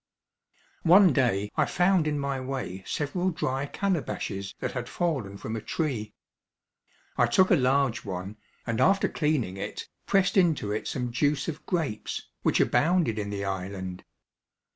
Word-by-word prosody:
One 180 Hz, +2 st, +7 dB
day 105 Hz, -7 st, +1 dB
I -, -, +3 dB
found 180 Hz, -2 st, +2 dB
in 150 Hz, -1 st, 0 dB
my 140 Hz, -1 st, -2 dB
way 130 Hz, -8 st, -4 dB
several 175 Hz, +6 st, -1 dB
dry 140 Hz, -5 st, -2 dB
calabashes 140 Hz, -, -2 dB
that -, -, -3 dB
had 125 Hz, -1 st, -5 dB
fallen 135 Hz, -, -2 dB
from 110 Hz, +2 st, -5 dB
a 110 Hz, -, -4 dB
tree. 110 Hz, -6 st, -3 dB, 1.0 s
I 120 Hz, -, +4 dB
took 185 Hz, +10 st, +4 dB
a -, -, +8 dB
large 135 Hz, -3 st, +2 dB
one, 95 Hz, +2 st, -5 dB, 0.3 s
and 115 Hz, -1 st, -1 dB
after 195 Hz, +1 st, +4 dB
cleaning 145 Hz, -, -1 dB
it, 95 Hz, -, -5 dB, 0.2 s
pressed 195 Hz, 0 st, +2 dB
into 160 Hz, -, +3 dB
it 105 Hz, -, -2 dB
some 125 Hz, -2 st, -2 dB
juice 145 Hz, +3 st, +1 dB
of 155 Hz, -2 st, -5 dB
grapes, 160 Hz, -, -2 dB
which -, -, +2 dB
abounded 160 Hz, -9 st, +2 dB
in 105 Hz, -1 st, -3 dB
the 100 Hz, -1 st, -3 dB
island. 95 Hz, -1 st, -4 dB
135 Hz, 150 wpm, -27 LUFS, 105-165 Hz, 1.0 s, a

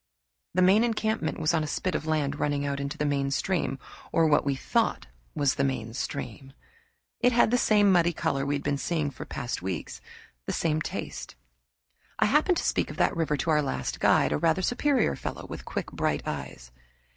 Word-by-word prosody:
The 185 Hz, -, +4 dB
main 195 Hz, +5 st, +5 dB
encampment 220 Hz, -6 st, -1 dB
was 155 Hz, +1 st, +1 dB
on 160 Hz, -2 st, +2 dB
a -, -, -3 dB
spit 185 Hz, +5 st, -2 dB
of 155 Hz, -, -3 dB
land 145 Hz, -2 st, 0 dB
running 145 Hz, -1 st, 0 dB
out 140 Hz, 0 st, -2 dB
into 140 Hz, +1 st, -4 dB
the 150 Hz, -, -1 dB
main 140 Hz, -1 st, 0 dB
stream, 140 Hz, -1 st, -1 dB, 0.3 s
or 165 Hz, -, +3 dB
what 150 Hz, -2 st, +4 dB
we 140 Hz, -1 st, 0 dB
thought 135 Hz, -, 0 dB, 0.3 s
was 140 Hz, -2 st, +2 dB
the 140 Hz, -, -1 dB
main 120 Hz, -5 st, -2 dB
stream. 135 Hz, 0 st, -5 dB, 0.7 s
It 245 Hz, +1 st, +4 dB
had 235 Hz, -1 st, +4 dB
the 245 Hz, -, +4 dB
same 205 Hz, -3 st, +4 dB
muddy 175 Hz, -1 st, +4 dB
color 135 Hz, -4 st, -1 dB
we 140 Hz, +1 st, 0 dB
had 140 Hz, -, -4 dB
been 140 Hz, -1 st, -1 dB
seeing 155 Hz, -3 st, -1 dB
for 125 Hz, -, -9 dB, 0.3 s
weeks 90 Hz, -5 st, -4 dB
past, -, -, -32 dB, 0.5 s
the -, -, -1 dB
same 155 Hz, -1 st, 0 dB
taste. -, -, -5 dB, 0.8 s
I -, -, +3 dB
happened 305 Hz, -, +3 dB
to -, -, -1 dB
speak -, -, 0 dB
of -, -, -8 dB
that -, -, +2 dB
river 160 Hz, -3 st, 0 dB
to 160 Hz, +4 st, 0 dB
our 150 Hz, -1 st, +4 dB
last 140 Hz, -, -3 dB
guide, 70 Hz, -, +4 dB
a 75 Hz, -, 0 dB
rather 190 Hz, -, +2 dB
superior 255 Hz, +3 st, +2 dB
fellow -, -, -6 dB
with -, -, -8 dB
quick, -, -, -4 dB
bright -, -, -1 dB
eyes. -, -, -6 dB
150 Hz, 205 wpm, -27 LUFS, 140-185 Hz, 0.8 s, main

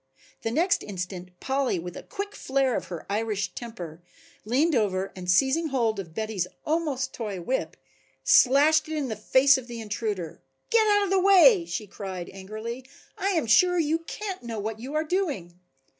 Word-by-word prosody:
The 225 Hz, -, -2 dB
next 350 Hz, -, +2 dB
instant 180 Hz, -2 st, -7 dB
Polly 270 Hz, -6 st, 0 dB
with 175 Hz, +1 st, -6 dB
a -, -, -7 dB
quick 405 Hz, 0 st, -6 dB
flare 265 Hz, -2 st, 0 dB
of -, -, -2 dB
her 175 Hz, -3 st, -7 dB
Irish 205 Hz, -2 st, -2 dB
temper, 175 Hz, -9 st, -8 dB, 0.4 s
leaned 280 Hz, +9 st, +2 dB
over 195 Hz, -5 st, 0 dB
and 180 Hz, -1 st, -6 dB
seizing 270 Hz, -, +3 dB
hold 230 Hz, -7 st, 0 dB
of 165 Hz, -4 st, -8 dB
Betty's 215 Hz, -5 st, -2 dB, 0.2 s
almost 295 Hz, -5 st, -1 dB
toy 210 Hz, -5 st, -4 dB
whip, 255 Hz, +10 st, -2 dB, 0.5 s
slashed 295 Hz, +4 st, +5 dB
it 315 Hz, -, -2 dB
in 280 Hz, -4 st, -2 dB
the 220 Hz, -, -2 dB
face 260 Hz, +6 st, +4 dB
of 245 Hz, -, -12 dB
the 235 Hz, -1 st, -7 dB
intruder. 205 Hz, -6 st, -4 dB, 0.3 s
"Get 450 Hz, -2 st, +4 dB
out 410 Hz, -1 st, +4 dB
of 390 Hz, -, -2 dB
the 390 Hz, -, +4 dB
way," 390 Hz, 0 st, +6 dB
she 225 Hz, -9 st, -4 dB
cried 190 Hz, -3 st, -7 dB
angrily. 215 Hz, +6 st, -6 dB, 0.3 s
"I 390 Hz, -, -1 dB
am 325 Hz, -7 st, +1 dB
sure 355 Hz, +11 st, +5 dB
you 320 Hz, 0 st, +1 dB
can't 380 Hz, +3 st, -6 dB
know 235 Hz, -2 st, -6 dB
what 215 Hz, +1 st, -4 dB
you 265 Hz, +6 st, -6 dB
are 310 Hz, -, +2 dB
doing." 290 Hz, -, -2 dB
240 Hz, 180 wpm, -26 LUFS, 200-315 Hz, 0.5 s, way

